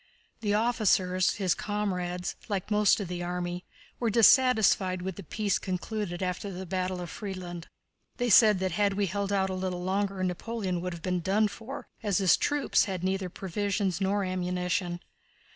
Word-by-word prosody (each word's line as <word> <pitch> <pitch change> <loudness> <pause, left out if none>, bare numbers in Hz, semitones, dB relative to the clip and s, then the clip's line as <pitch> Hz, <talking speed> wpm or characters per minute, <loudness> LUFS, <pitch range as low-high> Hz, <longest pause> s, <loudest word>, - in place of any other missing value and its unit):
The 210 -2 0
officers, 200 -5 +2
his 190 -4 +1
comrades, 180 -4 -3
like 200 0 -3
most 210 0 +4
of 200 - -3
the 175 0 -4
army, 175 0 -3 0.3
were 235 - +1
dissatisfied 220 -5 +4
with 190 -1 -4
the - - -8
peace 200 +3 -1
concluded 185 0 -3
after 180 +2 -3
the 185 +1 -6
battle 185 0 -2
of 175 - -6
Friedland. 180 -4 -6 0.5
They 245 -2 0
said 210 0 +7
that 190 -1 0
had 200 +3 +1
we 200 0 +1
held 200 +2 -2
out 190 -1 +1
a - - -2
little 185 -1 -3
longer 195 0 -1
Napoleon 185 0 -2
would 180 0 -3
have 170 - -9
been 180 -1 0
done 200 +5 +2
for, 230 +6 -8
as 205 -4 +1
his 190 -4 +5
troops 290 -1 +2
had 185 -3 -4
neither 190 0 -1
provisions 195 +1 -2
nor 200 +1 +1
ammunition. 180 -1 -2
190 Hz, 170 wpm, -28 LUFS, 180-205 Hz, 0.5 s, said